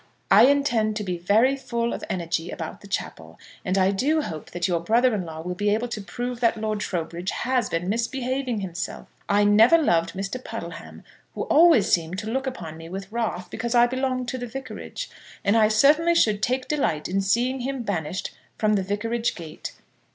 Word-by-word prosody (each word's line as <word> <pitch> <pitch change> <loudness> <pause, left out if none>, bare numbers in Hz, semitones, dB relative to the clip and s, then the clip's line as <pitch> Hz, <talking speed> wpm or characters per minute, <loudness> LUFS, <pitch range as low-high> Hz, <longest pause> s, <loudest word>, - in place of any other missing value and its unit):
I 245 - +8
intend 245 -7 +2
to 210 - -2
be 180 -3 -3
very 220 +9 +3
full 235 -3 -2
of - - -6
energy 170 -1 -2
about 165 -3 -6
the 200 - -12
chapel, 200 - -5 0.3
and 185 0 0
I 190 0 +4
do 290 +11 +1
hope 160 - -6
that 175 +1 -2
your 175 -2 +1
brother 235 +8 +3
in 195 -4 -2
law 160 -1 -7
will 180 +2 -4
be 205 +3 0
able 225 +4 0
to 215 -3 -4
prove 245 +4 -5
that 230 -2 +2
Lord 215 -1 -2
Trowbridge 175 -1 -3
has 250 -3 0
been 165 +2 -2
misbehaving 245 +2 -1
himself. 180 -2 -5 0.2
I 205 +1 +4
never 215 +9 +6
loved 170 - +2
Mr. 195 +7 -4
Puddleham, - - -8 0.3
who - - -2
always 320 - +5
seemed 170 +1 +1
to 215 +2 -4
look 265 +2 -1
upon 165 -11 -6
me 165 0 -10
with 195 +2 -7
wrath 215 -6 -3
because 235 +2 -2
I 240 0 +7
belonged 255 0 -1
to 255 - -4
the 245 - -4
Vicarage; 270 - -7 0.4
and 200 - +3
I 220 -1 +5
certainly 300 +10 +4
should 210 -10 +3
take 255 +4 0
delight 270 - 0
in 195 +2 0
seeing 240 +7 +1
him 260 0 -3
banished 180 -4 -3 0.2
from 215 -1 +2
the 200 -2 +1
Vicarage 225 +4 -1
gate. 160 -3 -8
215 Hz, 195 wpm, -24 LUFS, 185-250 Hz, 0.4 s, I